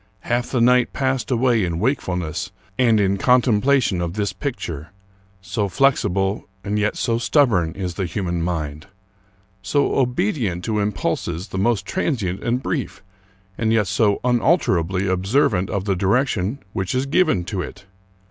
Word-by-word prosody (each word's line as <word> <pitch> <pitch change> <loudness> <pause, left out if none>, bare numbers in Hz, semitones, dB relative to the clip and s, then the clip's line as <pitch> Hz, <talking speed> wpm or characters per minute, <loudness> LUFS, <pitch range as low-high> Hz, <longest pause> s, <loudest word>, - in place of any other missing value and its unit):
Half 120 +3 -1
the 125 - 0
night 125 +1 +4
passed 130 -1 -1
away 120 -3 +2
in 85 -2 -1
wake 130 +10 +1
fulness 90 0 -3 0.2
and 115 -2 +3
in 100 -1 +2
contemplation 125 -4 +3
of 85 -1 -2
this 105 -2 -1
picture. 85 - -5 0.5
So 100 +2 -2
flexible, 100 -5 +1 0.2
and 105 +2 -1
yet 105 0 0
so 115 -1 0
stubborn, 115 - +2
is 90 -2 -4
the 95 0 -2
human 85 -2 -2
mind! 75 -4 -3 0.7
So 140 +9 +1
obedient 125 - 0
to 110 -2 0
impulses 90 -2 -2
the 95 - -3
most 100 -1 +1
transient 115 - -2
and 125 +2 -1
brief, - - -3 0.6
and 110 -1 +1
yet 110 -2 +3
so 100 +1 +2
unalter 125 - +3
ably 95 +3 -2
observant 95 +2 +1
of 100 -1 -2
the 100 -2 +1
direction 105 +3 0
which 95 +5 -2
is 130 +1 +1
given 150 - +2
to 95 -1 -3
it! 90 +2 -8
105 Hz, 155 wpm, -21 LUFS, 90-125 Hz, 0.7 s, night